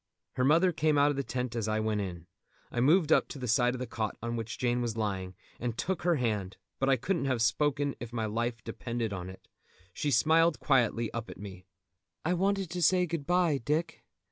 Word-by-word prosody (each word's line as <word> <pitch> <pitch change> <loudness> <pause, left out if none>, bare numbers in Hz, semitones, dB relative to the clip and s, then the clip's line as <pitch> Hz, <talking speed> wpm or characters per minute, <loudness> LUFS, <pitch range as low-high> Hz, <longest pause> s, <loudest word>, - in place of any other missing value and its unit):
Her 130 - 0
mother 165 +7 +4
came 155 -2 +1
out 145 +1 +5
of - - -3
the 140 - 0
tent 125 -3 -3
as 115 -2 -1
I 110 0 0
went 110 -1 0
in. 85 -4 -6 0.5
I 120 - -2
moved 155 +5 +4
up - - +4
to - - -8
the 125 -2 -4
side 120 +2 +3
of - - -6
the 130 - -3
cot 110 -3 -3
on 120 +1 -3
which 115 -1 -4
Jane 120 0 0
was 115 -2 -2
lying, 95 -4 -2 0.2
and 120 -1 -3
took 190 -1 -2
her 175 0 +2
hand, 105 -8 -2 0.2
but 135 - +1
I 135 - +5
couldn't 170 +5 -1
have 130 -3 0
spoken 145 +5 +1
if 120 -1 -7
my 115 -2 -2
life 115 +1 -2
depended 115 -3 -3
on 90 -1 -5
it. 95 - -13 0.5
She 150 - -1
smiled 160 +5 +4
quietly 120 -4 +1
up 115 -1 -4
at - - -9
me. 95 -2 -9 0.6
"I 175 - +2
wanted 195 0 0
to 180 0 -3
say 180 +2 +4
good 165 -4 -4
bye, 175 -5 +2
Dick. 155 +7 -2
125 Hz, 220 wpm, -30 LUFS, 110-155 Hz, 0.6 s, out